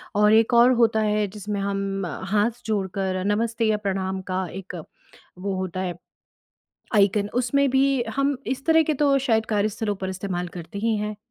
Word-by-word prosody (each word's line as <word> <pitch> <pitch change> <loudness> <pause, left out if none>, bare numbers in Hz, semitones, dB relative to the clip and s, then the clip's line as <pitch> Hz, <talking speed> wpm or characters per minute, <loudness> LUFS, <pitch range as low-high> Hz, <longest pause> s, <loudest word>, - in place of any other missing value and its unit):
और 210 +1 +5
एक 225 +2 +4
और 240 +2 +7
होता 220 -1 +3
है 210 -1 +1
जिसमें 205 0 -5
हम 195 -1 -2 0.3
हाथ 215 +3 +1
जोड़कर 190 -3 -1
नमस्ते 225 +3 0
या 215 -1 +2
प्रणाम 190 -2 -2
का 185 0 -1
एक 195 0 -7 0.6
वो 195 +1 -2
होता 185 -1 -4
है 180 -2 -2 1.0
आइकन, 205 0 +3
उसमें 270 +3 +2
भी 270 -1 +2
हम 275 0 +1
इस 265 +2 -3
तरह 320 0 +5
के 310 0 0
तो 280 0 +3
शायद 225 -4 +1
कार्यस्थलों 210 0 -1
पर 190 -1 -4
इस्तेमाल 185 -2 -3
करते 175 +4 -8
ही 225 +1 +1
हैं। 210 0 -3
210 Hz, 170 wpm, -24 LUFS, 195-230 Hz, 1.0 s, और